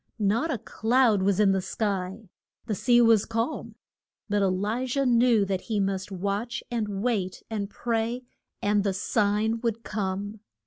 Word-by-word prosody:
Not 220 +9 +1
a 270 - 0
cloud 225 -1 +2
was 195 0 +2
in 205 -2 +5
the 190 -1 +1
sky. 195 0 -3 0.3
The 225 - -2
sea 240 +4 +4
was 225 -3 +5
calm. 230 +6 -3 0.5
But 205 0 +1
E - - +3
li 205 +7 -1
jah 275 +2 0
knew 235 -3 +4
that 190 -1 -2
he 220 -3 -2
must 195 0 -1
watch, 200 +5 -3
and 210 -4 -2
wait, 200 -7 -1
and 205 -2 -2
pray, 235 +2 -2 0.4
and 205 0 +2
the 200 -1 0
sign 210 +3 +1
would 230 -1 -2
come. 205 +1 -3
210 Hz, 165 wpm, -27 LUFS, 195-230 Hz, 0.5 s, in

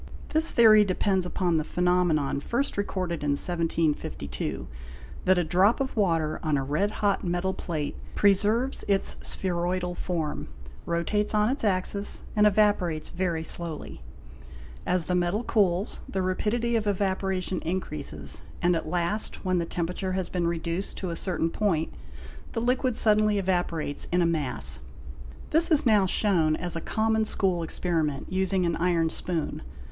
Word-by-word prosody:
This 320 +1 +5
theory 215 -3 +6
depends 190 -1 0
upon 175 -2 0
the 155 - 0
phe - - -16
nomenon, 175 -6 +2
first 245 - -1
recorded 185 -5 -3
in 145 -1 +1
1752, 165 - -2 0.6
that 185 0 +4
a 175 - +2
drop 185 - +3
of 270 -1 -3
water 165 -7 0
on 155 -3 0
a 135 - -1
red 150 +9 0
hot 205 -2 0
metal 175 +1 -1
plate 155 -6 -4 0.2
preserves 210 +6 +2
its 195 -1 +1
spheroidal 180 0 -1
form, 165 -4 -3 0.4
rotates 210 +6 0
on 210 +1 +3
its 270 0 -1
axis, 200 0 -1
and 210 0 +5
evaporates 190 -6 +1
very 170 -3 -2
slowly; 160 - 0 0.9
as 180 -2 +1
the 180 - -1
metal 180 +5 0
cools, 195 -4 +1
the 190 -1 -2
rapidity 230 +6 -1
of 215 -2 0
evaporation 190 -2 -1
increases, 145 - -3 0.2
and 175 0 +2
at 165 - -3
last, 180 +5 -1
when 185 -1 +1
the 170 - -1
temperature 180 +3 -3
has 185 -1 -2
been 175 -2 -1
reduced 170 +2 -3
to 185 -3 -4
a - - -4
certain 165 -2 -2
point, 165 -7 -1 0.6
the - - -1
liquid 250 +1 0
suddenly 215 -1 +4
evaporates 175 -6 -1
in 175 0 +3
a - - +2
mass. 130 - -1 0.7
'This 320 +2 +6
is 310 -3 +6
now 210 -5 +4
shown 170 -6 +2
as 175 +1 -1
a 165 - -3
common 220 +3 0
school 190 -4 0
experiment, 160 -2 -2
using 190 -1 +1
an 170 -1 0
iron 170 -1 +1
spoon. 165 -1 -3
180 Hz, 150 wpm, -26 LUFS, 165-205 Hz, 0.9 s, theory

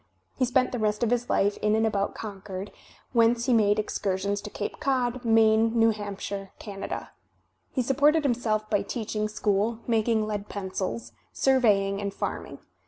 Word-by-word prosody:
He 255 - +2
spent 255 +1 +2
the 245 - -3
rest 215 +1 0
of 235 - +1
his 245 0 0
life 200 +1 +2
in 210 0 +3
and 220 0 +2
about 200 -2 0
Con 205 -3 -7
cord, 195 0 -6 0.4
whence 235 0 +3
he 255 - +3
made 210 -2 +4
excursions 200 -1 -1
to - - -7
Cape 205 - -5
Cod, 255 -4 0
Maine, 225 0 +4
New 225 0 +5
Hampshire, 200 -1 -5
Canada. 200 -2 -6 0.6
He 255 - 0
supported 290 +5 +3
himself 225 -5 0
by 205 -2 +1
teach 220 +2 -5
ing 215 0 +1
school, 210 +2 0
making 225 -1 +2
lead 210 -1 -4
pencils, 185 - -4 0.2
surveying 205 -7 +3
and 200 -1 -2
farming. - - -4
215 Hz, 170 wpm, -27 LUFS, 200-235 Hz, 0.6 s, New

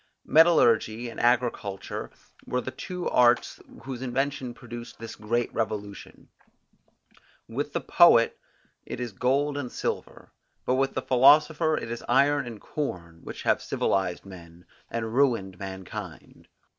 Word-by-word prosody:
Metallurgy 120 -8 +4
and - - -9
agriculture 120 -5 -1 0.4
were 125 - 0
the 130 - -6
two 180 +7 -5
arts 120 0 +3 0.2
whose 130 -1 -6
invention 130 -1 -2
produced 120 0 -9
this 115 0 -8
great 115 +3 -2
revolution. 105 -3 -5 1.2
With 140 +5 -4
the - - -1
poet, 145 -10 +5 0.4
it - - -7
is 120 -2 -4
gold 140 +6 0
and 125 -4 -5
silver, - - -5 0.3
but 125 - +1
with 135 +1 0
the 130 - -2
philosopher 150 +4 +4
it 115 - -5
is 120 - -5
iron 140 +1 +3
and 115 -3 -8
corn, 85 - -5
which - - -8
have - - +2
civilized 95 -2 -1
men, 85 -2 -13 0.2
and 115 -1 -4
ruined 115 -9 +1
mankind. 95 -2 -8
120 Hz, 130 wpm, -26 LUFS, 110-135 Hz, 1.2 s, poet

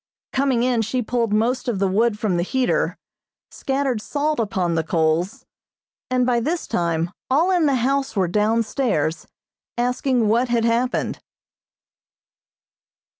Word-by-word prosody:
Coming 265 -3 +1
in, 245 -2 +2
she 245 +3 -1
pulled 230 -1 -1
most 230 +5 +1
of 235 -5 0
the 195 0 +1
wood 210 +3 +1
from 205 -4 0
the - - +1
heater, 250 +7 0 0.5
scattered 270 -4 -1
salt 295 +3 -1
upon 190 -6 0
the 165 -1 0
coals, 165 +3 0 0.6
and 255 -1 +2
by 245 -1 +2
this 320 +8 -2
time 170 0 -1 0.2
all 320 +8 +3
in 350 -4 +3
the 275 - +2
house 270 +2 0
were 190 -3 +2
down 215 +5 +2
stairs, 205 - -1 0.5
asking 250 -1 +1
what 235 +4 +2
had 235 -1 +1
happened. 235 +2 0
235 Hz, 140 wpm, -22 LUFS, 200-255 Hz, 0.6 s, all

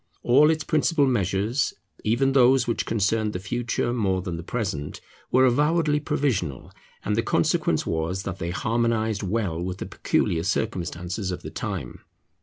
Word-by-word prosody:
All 145 +5 +5
its 155 -1 +1
principal 155 -1 +2
measures, 110 +2 0 0.3
even 120 +5 +2
those 130 -1 +5
which 115 - -2
concerned 110 0 +1
the 90 - -3
future 120 +4 -2
more 95 -6 0
than 90 -3 -4
the 85 - -5
present, 90 -7 -4 0.3
were 130 +1 +5
avowedly 150 +4 +2
provisional; 105 - -1 0.3
and - - +1
the - - +2
consequence - - +1
was 85 +4 -2
that 95 -1 -5
they 85 - -3
harmonized 110 +2 0
well 95 -4 -1
with 90 +1 -3
the - - -5
peculiar 80 - 0
circumstances 90 -1 -2
of 90 - -5
the - - -7
time. - - -5
110 Hz, 155 wpm, -25 LUFS, 90-125 Hz, 0.3 s, All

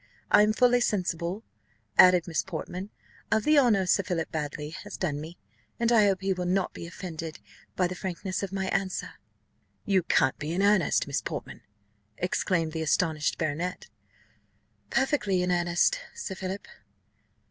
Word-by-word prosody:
I 205 - +7
am 210 +1 +4
fully 245 +2 +4
sensible," 185 -2 -1 0.5
added 180 - +7
Miss 165 -2 0
Portman, 185 +2 -6 0.4
"of 220 -1 +3
the 305 -1 +5
honour 215 -8 +3
Sir 185 - +3
Philip 170 -3 -3
Baddely 150 -1 -4
has - - -8
done 150 -6 -2
me, 165 +3 -9 0.4
and 235 0 +2
I 220 -3 +6
hope 195 -1 +1
he 195 0 +1
will 180 -1 -3
not 185 +1 0
be 170 - -7
offended 165 -3 -6 0.4
by 185 - +2
the 180 - -2
frankness 185 +1 -4
of 200 -2 -4
my 190 -1 -2
answer." 195 -1 -2 0.7
"You 195 -3 +3
can't 130 -5 +2
be 150 +2 -3
in 190 +3 +1
earnest, 200 -5 +3
Miss - - -2
Portman!" - - -6 0.6
exclaimed 180 -2 0
the 160 0 -3
astonished 155 -1 +1
baronet. 165 +3 -3 1.0
"Perfectly 235 -10 +1
in 180 - 0
earnest, 175 - +2 0.2
Sir 465 - -5
Philip." 190 +1 -5
185 Hz, 160 wpm, -28 LUFS, 170-200 Hz, 1.0 s, I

